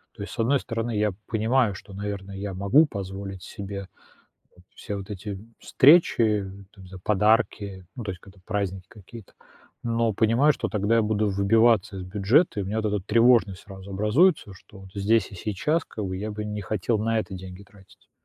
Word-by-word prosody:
То 100 - -7
есть - - -8
с - - -11
одной 130 +4 +3
стороны, 115 -2 -3
я 105 -1 +1 0.2
понимаю, 110 -1 +1
что, 100 - -12
наверное, 100 -1 -5
я 95 -1 -5
могу 110 +12 +4
позволить 95 -3 -6
себе 100 -1 -7 0.7
вот 90 - -20
все 105 - -6
вот 95 -1 -7
эти 100 -1 -6 0.2
встречи, 115 - +4 0.3
там, 95 -2 -14
не - - -13
знаю, 95 -1 -11
подарки, 105 -3 +1
ну, 120 - -5
то 100 - -3
есть 90 - -8
когда 95 0 -17
праздники 95 -2 -3
какие-то, 105 +1 -13 0.5
но 115 -1 0
понимаю, 115 +8 +3
что - - -3
тогда 105 +2 +1
я 115 - +4
буду 105 -1 0
выбиваться 100 +1 +3
из 95 - -5
бюджета. 105 - +2
И - - -1
у - - -6
меня 110 +2 -2
вот 105 -1 -1
эта 105 - 0
тревожность 115 -4 +3
сразу 95 -1 -11
образуется, 105 - +2
что 95 +2 -16
вот 95 -1 -13
здесь 100 +1 +1
и - - -8
сейчас 110 - -1
как 105 - -6
бы 95 - -3
я 105 +2 -4
бы 105 0 -5
не 105 0 -4
хотел 110 +3 -1
на 115 +1 0
это 105 - -4
деньги 95 +1 -9
тратить. 100 -1 -21
105 Hz, 195 wpm, -25 LUFS, 95-115 Hz, 0.7 s, могу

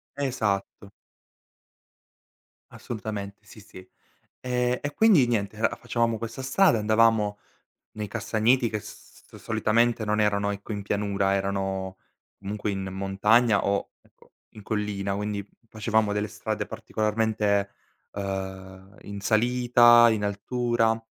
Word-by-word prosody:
Esatto. 105 -7 -2 1.8
Assolutamente, 105 -3 -6
sì, 105 - -14
sì. 95 -2 -14 0.5
E 125 0 -1
e 145 0 -4
quindi 195 - +5
niente, 105 -2 -1
ehm, 110 - +2
facevamo 115 -2 -1
questa 115 +3 -6
strada, 135 - +3
andavamo 110 -1 +2 0.5
nei 105 -1 -5
castagneti 115 +5 +1
che 105 -1 -3
s - - -12 0.2
s - - -16
solitamente 110 +1 +1
non 105 +1 0
erano 100 -1 +1
ecco 100 +2 -7
in 100 -1 -3
pianura, 100 -1 0
erano 95 -1 -2 0.4
comunque 100 +1 -3
in 95 -1 -3
montagna 100 +4 +2
o, 100 0 0
ecco, - - -26 0.2
in 105 - -13
collina, 100 -2 -2
quindi 105 0 -3
f 115 +3 -32
facevamo 110 -1 0
delle 105 +1 -1
strade 110 -1 -4
particolarmente, 105 -1 -1 0.4
ehm, 95 0 -6
in 100 0 -8
salita, 120 +2 +5
in 105 -2 -1
altura 115 +2 0
105 Hz, 120 wpm, -26 LUFS, 100-115 Hz, 1.8 s, quindi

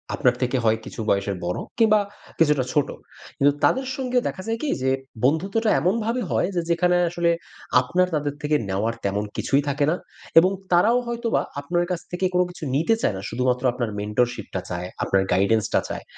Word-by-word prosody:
আপনার 125 -1 +2
থেকে 125 +1 +1
হয় 110 0 +4
কিছু - - -9
বয়সের 100 0 +1
বড়ো, 90 - -2 0.2
কিংবা 215 -2 +5 0.4
কিছুটা 150 -4 +4
ছোট। 145 -2 +2 0.5
কিন্তু 140 +1 +4
তাদের 265 0 +3
সঙ্গে 255 -2 -1
দেখা 185 - -5
যায় 225 0 -1
কি? 300 - 0
যে 130 - +1 0.4
বন্ধুত্বটা 195 - +1
এমনভাবে 225 - 0
হয় - - +2
যে 175 - +2
যেখানে 180 +1 +3
আসলে 170 0 +1 0.5
আপনার 180 0 +1
তাদের 145 -1 -1
থেকে 150 +1 +1
নেওয়ার 105 +4 0
তেমন 100 +1 0
কিছুই 140 +1 +2
থাকে 145 +1 +1
না। 175 - +1 0.4
এবং 185 +3 +3 0.2
তারাও 215 +8 +5
হয়তোবা 235 -1 0 0.2
আপনার 175 +4 0
কাছ 175 - -1
থেকে 180 +1 -1
কোনো 180 - +4
কিছু 175 - -11
নিতে 165 +10 +3
চায় - - +1
না। 95 - -6
শুধুমাত্র 125 +1 0
আপনার 120 -3 -2
mentorship 110 +2 -1 0.2
চায়, 90 0 -4 0.2
আপনার 95 0 +2
guidance 105 +3 +2
-টা - - +5
চায়। - - -5
150 Hz, 180 wpm, -23 LUFS, 120-185 Hz, 0.5 s, কিংবা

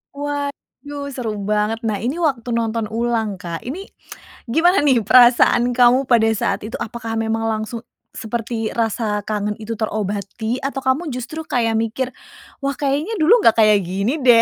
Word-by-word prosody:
Waduh 285 0 -5
seru 225 -5 -4
banget. 210 +2 0
Nah 210 -3 -1
ini 255 +8 -2
waktu 270 -8 -1
nonton 230 -2 -1
ulang, 225 -3 -1
Kak. 170 -2 -6
Ini 335 +11 -6 0.6
gimana 325 +9 +3
nih 260 -5 +4
perasaan 240 +1 +5
kamu 250 +2 +4
pada 230 -3 +4
saat - - -1
itu? 215 +2 -6
Apakah 225 0 -5
memang 225 0 -1
langsung 220 +1 -3 0.3
seperti 225 0 -3
rasa 220 -2 -1
kangen 210 -1 -2
itu 220 +1 -5
terobati? 215 +2 -3
Atau 270 -1 -4
kamu 290 +5 +1
justru 255 +5 -5
kayak 230 -2 +1
mikir 245 +3 -2 0.5
wah 275 0 -1
kayaknya 295 +10 -1
dulu 390 +9 +5
nggak 230 - +4
kayak 215 -2 +5
gini 195 - -2
deh 240 -2 +6
235 Hz, 155 wpm, -20 LUFS, 220-270 Hz, 0.6 s, deh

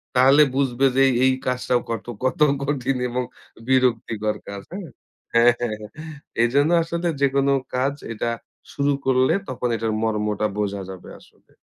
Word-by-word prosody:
তাহলে 135 +4 +6
বুঝবে 135 -1 +1
যে 135 - +4
এই, - - +1
এই 130 - +5
কাজটাও 125 -1 0
কত, 115 -2 -3 0.2
কত 130 - 0 0.2
কঠিন 135 -2 -1
এবং 125 +1 -1 0.4
বিরক্তিকর 115 -4 +1
কাজ 100 -1 -6
হ্যাঁ? 185 -3 -7 0.4
হ্যাঁ, 115 +1 +6
হ্যাঁ, 120 -3 -2
হ্যাঁ 105 -1 -9 0.5
এজন্য 140 +6 +3
আসলে 170 +1 -3
যেকোনো 140 0 +2 0.2
কাজ 135 +2 +1 0.2
এটা 115 +1 -2 0.4
শুরু 140 0 +1
করলে 130 0 +3 0.2
তখন 125 -1 -2
এটার 110 -1 -1
মর্মটা 105 -1 0
বোঝা 100 -1 -2
যাবে 95 -2 -10
আসলে। - - -24
125 Hz, 150 wpm, -23 LUFS, 110-135 Hz, 0.5 s, তাহলে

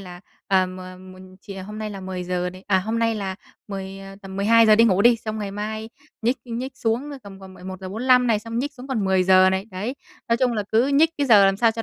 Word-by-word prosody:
là, 180 -2 -10 0.3
à, 190 -1 +3
m 185 0 -9 0.4
một 185 - -14 0.2
chìa 195 -1 -9
hôm 210 +2 -8
nay 215 -1 -4
là 195 -1 -7
10:00 180 -1 -3
này, 185 +1 -14
à, 190 -2 +3
hôm 220 +5 -2
nay 230 0 +1
là 195 -3 -4 0.3
10, 195 -1 -6
ờ, 195 0 -11
tầm 190 0 -9
12:00 220 +1 +5
đi 230 - +6
ngủ 200 -3 +3
đi, 240 0 +6
xong 220 -1 -5
ngày 205 -2 -4
mai 215 +2 -5 0.3
nhích 245 +3 +1
nhích 255 +3 -5
xuống 240 +5 -1
tầm 195 -1 -12
còn 190 -1 -12
11:45 200 +8 0
này, 225 -3 +2
xong 230 +2 -5
nhích 285 +3 -2
xuống 260 0 -11
còn 235 -7 -1
10:00 185 0 +4
này, 190 +1 -1
đấy. 205 +8 -4 0.3
Nói 230 - +3
chung 250 0 +1
là 215 -3 -1
cứ 230 +4 +4
nhích 300 +3 +4
cái 285 - +1
giờ 210 -5 +7
làm 195 0 +2
sao 230 +1 +3
cho 225 0 -5
210 Hz, 245 wpm, -23 LUFS, 190-230 Hz, 0.4 s, giờ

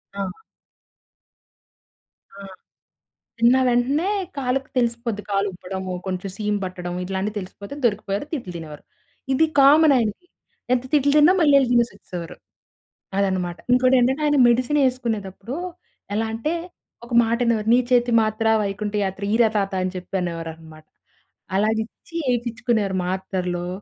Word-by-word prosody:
ఆ! 200 - -3 2.1
ఆ! 200 - -11 1.0
తిన్న 240 +2 +5
వెంటనే 270 +9 +1 0.3
కాలుకి 265 0 -1
తెలిసిపోద్ది 235 -3 -1
కాలు 200 0 +1
ఉబ్బడము, 185 +1 -6
కొంచెం 185 +1 -3
సీము 210 -1 -1
పట్టడం, 180 -1 -5
ఇట్లాంటియి 195 +3 -3
తెలిసిపోతే 200 +5 -9
దొరికిపోయారు. 205 0 -1
తిట్లు 235 - -4
తినేవారు. 155 -3 -9 0.5
ఇది 320 +5 +4
కామన్ 290 +2 +7
ఆయనకి. 230 - -2 0.5
ఎంత 245 - +1
తిట్లు 285 -1 +4
తిన్నా 300 +5 +6
మళ్ళీ 290 -3 +5
ఎళ్ళి 255 -3 +1
తినేసొచ్చేసేవారు. 200 -7 -1 0.8
అదనమాట. 185 -3 0 0.2
ఇంకోటేంటంటే 255 +2 +3
ఆయన 290 -1 +2
మెడిసిన్ 255 +5 +2
ఏసుకునేటప్పుడు 225 -3 -4 0.6
ఎలా 225 +2 0
అంటే 300 +9 -2 0.5
ఒక 235 - -9
మాటనేవారు, 230 -1 0
"నీ 250 - +6
చేతి 245 -1 +3
మాత్ర, 215 +1 -1 0.2
వైకుంఠ 205 +1 -3
యాత్ర" 195 +1 -5
ఈర 235 +1 +5
తాత. 195 -1 0
అని 185 - -1
చెప్పి 185 +2 -6
అనేవారన్నమాట. 160 -2 -7 0.7
అలా 210 +3 +3
ఇచ్చి 285 +8 -17 0.2
ఏపించుకునేవారు 230 -4 -1
మాత్రలు. 180 -2 -3
215 Hz, 120 wpm, -22 LUFS, 190-250 Hz, 2.1 s, కామన్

